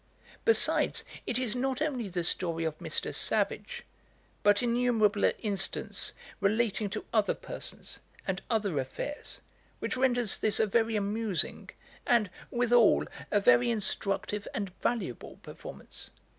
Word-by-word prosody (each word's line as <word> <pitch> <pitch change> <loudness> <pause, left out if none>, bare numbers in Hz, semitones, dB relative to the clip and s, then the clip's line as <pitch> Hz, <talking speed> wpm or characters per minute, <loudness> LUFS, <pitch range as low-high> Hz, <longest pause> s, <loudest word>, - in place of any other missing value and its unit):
Besides, 455 -1 +3 0.2
it 240 - 0
is 250 -3 0
not 260 +1 0
only 265 -9 -1
the 175 -1 -2
story 165 -1 +1
of 160 -2 -1
Mr. - - -2
Savage, 485 -1 0 0.6
but 205 +1 +4
innumerable 235 -4 +3
incidents 200 -4 -2 0.3
relating 215 0 +1
to - - -5
other 215 -2 +3
persons, - - -6 0.3
and 190 0 -2
other 205 - +1
affairs, 215 - -4 0.4
which - - -2
renders 245 -4 +3
this 215 -1 +1
a - - +5
very 225 +1 +2
amusing, 210 -2 -1 0.4
and, 220 -6 +3 0.2
withal, 240 -2 +4 0.2
a 205 - +3
very 120 - +5
instructive 205 -2 -1
and 200 -3 -2
valuable 200 - -2
performance. - - -9
215 Hz, 125 wpm, -30 LUFS, 195-240 Hz, 0.6 s, a